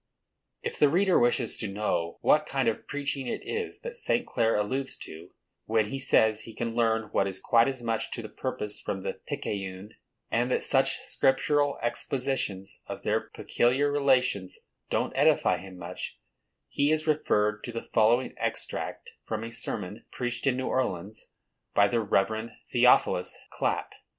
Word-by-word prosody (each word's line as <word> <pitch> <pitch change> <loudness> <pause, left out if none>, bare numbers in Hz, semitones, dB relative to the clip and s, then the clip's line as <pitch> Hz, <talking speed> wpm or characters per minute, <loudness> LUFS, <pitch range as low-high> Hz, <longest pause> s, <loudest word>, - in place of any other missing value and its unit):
If - - -4
the 145 - +6
reader 185 +4 +4
wishes 120 -1 +2
to 110 - -1
know 95 -4 -2
what - - +4
kind - - 0
of - - -1
preaching 140 -2 -2
it - - -3
is 450 -1 -3
that 485 0 -6
St. 245 - 0
Clare 115 -1 +1
alludes 130 +6 -1
to, 80 +3 -10 0.4
when 110 -1 +1
he 135 - -4
says 110 -4 +3
he 115 - -10
can 115 -1 -3
learn 115 -2 +1
what 100 - +2
is 95 -1 -3
quite 115 +4 +4
as 130 -3 -3
much 115 -1 -1
to - - -4
the - - -6
purpose 105 -1 -4
from 95 - -3
the - - -4
Picayune, 95 +1 -4 0.4
and 120 +2 +1
that - - +1
such - - +3
scriptural 145 +2 +2
expositions 120 -5 -2
of - - -7
their - - +1
peculiar 135 +4 +1
relations 125 -10 +2 0.3
don't - - -1
edify 90 - +4
him 95 +1 -10
much, 85 -1 -6 0.5
he 145 +2 +1
is 155 0 +1
referred 105 -9 +1
to 120 - -5
the 115 0 -6
following 120 +4 +3
extract - - -2 0.2
from 110 0 -3
a 115 - -6
sermon 105 -2 -3
preached 120 +1 -2
in 130 -2 +2
New 130 - -2
Orleans, 105 -4 -2 0.5
by 100 - +6
the 120 +2 +1
Rev. 110 +2 0 0.2
Theophilus - - +4
Clapp. - - -1
115 Hz, 165 wpm, -28 LUFS, 105-135 Hz, 0.5 s, the